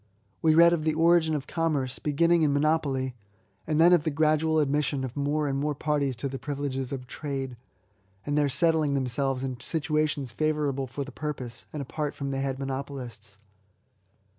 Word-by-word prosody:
We 160 -1 +4
read 170 +1 +7
of 160 -3 0
the 155 -1 +1
origin 165 -1 +4
of 140 -2 -3
Commerce, 150 -6 -1
beginning 170 +3 +2
in 150 -2 +3
monopoly; 145 -3 +1 0.5
and 155 -1 +1
then 175 +2 +7
of 170 -4 +4
the 160 - 0
gradual 155 +1 +2
admission 145 -2 +1
of 130 -2 -5
more 145 +1 0
and 135 0 -1
more 150 +1 -1
parties 145 -3 0
to 120 +4 -2
the 135 0 -5
privileges 135 -2 -3
of 130 -2 -5
trade, 135 -1 -4 0.7
and 145 - -1
their 145 -1 +3
settling 155 +1 +2
themselves 135 0 0
in 130 -2 -4
situations 150 -4 -1
favour 155 +1 0
able 135 -1 -3
for 135 +3 -4
the 140 - -9
purpose, 130 -6 -5
and 150 -2 -4
apart 150 +2 -4
from 140 -1 -4
the 135 - -2
head 135 -1 -2
monopolists. 130 -6 -6
145 Hz, 180 wpm, -27 LUFS, 135-155 Hz, 0.7 s, read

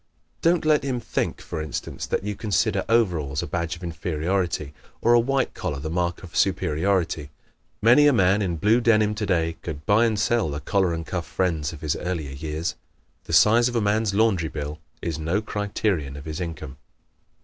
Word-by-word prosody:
Don't 170 -1 +2
let 155 -1 +4
him 130 -3 -1
think, - - -2
for 80 - -5
instance, 75 -2 -5
that - - -1
you 105 0 -3
consider 100 -2 0
overalls 85 -11 +1
a - - -2
badge 85 -1 -2
of 90 - -13
inferiority, 85 -1 -2 0.3
or 120 - +4
a 120 - +7
white 135 +2 0
collar 75 - -3
the 80 +3 -4
mark 85 +1 -1
of 85 - -11
superiority. 90 -4 +1 0.5
Many 125 +6 +7
a - - +6
man 100 -4 +3
in 90 -4 -1
blue 110 +8 +3
denim 110 -2 +3
today 90 -6 0
could 75 -3 -6
buy 105 +3 +4
and 110 -2 -1
sell 115 -4 +1
the 70 0 -4
collar 95 +4 +1
and 80 -1 -3
cuff 85 0 -4
friends 80 -5 -1
of 80 - -10
his 75 0 0
earlier 85 -6 -3
years. 80 +4 -3 0.5
The - - -6
size 115 +8 +5
of 120 - -6
a - - +3
man's 105 -1 +1
laundry 100 -7 +2
bill 75 0 -5 0.2
is 80 -2 -2
no 85 +6 0
criterion 100 -8 -2
of 70 - -10
his 80 +3 -5
income. 75 -5 -6
90 Hz, 190 wpm, -24 LUFS, 80-105 Hz, 0.5 s, a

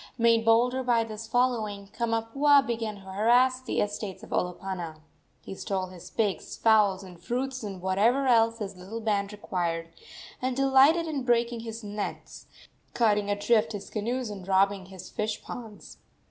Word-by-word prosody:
Made 230 -1 +4
bolder 240 +3 +3
by 240 -2 +2
this 225 0 -7
following, 220 -5 0
Kamapuaa 235 +5 +3
began 225 -3 -3
to 200 - -13
harass 240 +7 +2
the 255 - -2
estates 205 -2 -4
of - - -12
Olopana. 180 -2 -3 0.5
He - - -7
stole 190 -1 -3
his 180 -2 -11
pigs, 210 -4 -2
fowls 210 -4 +3
and 180 -3 -13
fruits, 260 +6 -3
and 200 -4 -6
whatever 220 +9 +2
else 230 -2 +4
his 200 -3 -5
little 190 +5 -7
band 205 -2 -1
required, 170 -5 -3 0.5
and 255 0 -1
delighted 275 +5 +5
in 305 -4 -3
breaking 240 -1 +1
his 225 0 -7
nets, 205 0 -6 0.5
cutting 210 -3 +2
adrift 210 +2 +2
his 205 - -7
canoes 235 +2 -2
and 195 -3 -8
robbing 195 0 +2
his 190 -1 -10
fish 215 0 -3
ponds. 220 -4 -9
220 Hz, 155 wpm, -27 LUFS, 200-240 Hz, 0.5 s, delighted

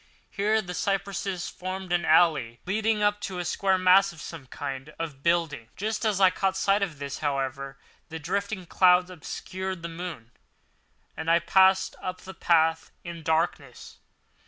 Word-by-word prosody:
Here 215 +2 +1
the 180 -1 -6
cypresses 195 -2 -2
formed 185 0 -5
an 175 -2 +1
alley 150 -8 +3
leading 215 +2 0
up 205 0 +2
to 190 -2 -5
a 175 - -3
square 190 +3 +1
mass 185 +2 +5
of 170 - -14
some 150 -4 -9
kind 135 +3 -6
of 150 -5 -6
building. 160 -8 0
Just 220 +3 -2
as 210 -3 +1
I 190 -2 +6
caught 190 +1 -1
sight 195 +1 +2
of 175 -7 -2
this, 140 -1 -5
however, 135 -1 -3 0.3
the 160 - -5
drifting 195 +4 -3
clouds 180 +1 +4
obscured 185 +1 -6
the 170 - -4
moon, 165 -9 -7 0.8
and 160 +1 -4
I 165 - +6
passed 190 +3 +3
up 185 0 -5
the 190 - -9
path 160 -2 +2
in 170 -1 -7
darkness. 160 -5 -2
175 Hz, 160 wpm, -27 LUFS, 160-190 Hz, 0.8 s, I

